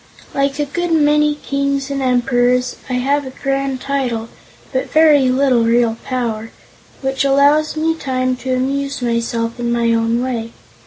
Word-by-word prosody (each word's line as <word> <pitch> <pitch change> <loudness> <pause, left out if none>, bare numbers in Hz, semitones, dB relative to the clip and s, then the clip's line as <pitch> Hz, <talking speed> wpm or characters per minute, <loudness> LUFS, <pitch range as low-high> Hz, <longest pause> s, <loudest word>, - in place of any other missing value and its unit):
Like 275 0 0
a 295 - 0
good 345 +4 -3
many 300 -1 +3
kings 280 -1 -2
and 275 -1 -2
emperors, 250 0 +1
I - - -2
have 275 +3 0
a - - -5
grand 275 0 -2
title, 245 -5 -2 0.4
but 260 - -1
very 300 -4 +5
little 255 -2 +3
real 230 0 +2
power, 230 -4 -3 0.5
which 270 +1 0
allows 285 +3 +3
me 320 +1 +1
time 255 -4 -1
to 255 0 -2
amuse 275 +1 -2
myself 230 0 -1
in 240 0 -1
my 235 -1 +2
own 230 +1 +1
way. 230 -3 -4
260 Hz, 155 wpm, -17 LUFS, 240-280 Hz, 0.5 s, very